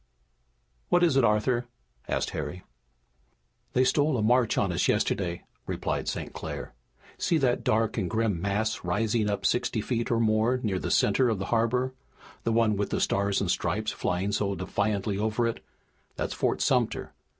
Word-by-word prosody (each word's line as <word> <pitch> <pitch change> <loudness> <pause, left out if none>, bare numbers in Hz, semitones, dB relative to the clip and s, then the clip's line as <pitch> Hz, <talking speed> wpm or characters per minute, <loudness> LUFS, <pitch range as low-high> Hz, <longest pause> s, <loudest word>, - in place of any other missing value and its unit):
"What 175 0 +4
is 165 -6 +4
it, 135 - +4
Arthur?" 120 +3 +2 0.4
asked - - -1
Harry. 80 +4 -5 1.1
"They 130 - +4
stole 145 +2 +2
a 110 - 0
march 120 0 +3
on 100 -3 +2
us 85 - +1
yesterday," 85 -3 0 0.2
replied - - -2
St. - - -4
Clair. - - -6 0.5
"See 170 - +2
that 130 -5 +1
dark 110 +1 +1
and 90 -4 -1
grim 110 -4 0
mass 105 +3 -1
rising 105 +4 0
up 100 - -2
sixty 120 -1 +1
feet 115 +2 -2
or 115 - +2
more 110 +3 +2
near 95 -4 0
the - - -3
center 130 -2 +3
of 110 - 0
the 95 - -3
harbor, 125 +3 +1 0.5
the 115 - +2
one 110 -2 +3
with 100 - -1
the - - -1
Stars 100 0 +1
and 95 -3 +1
Stripes 105 +5 -1
flying 95 +3 -1
so 100 -1 0
defiantly 100 +2 -1
over 110 +2 0
it? 115 - -3 0.5
That's - - -3
Fort - - 0
Sumter. - - +1
110 Hz, 170 wpm, -27 LUFS, 100-120 Hz, 1.1 s, What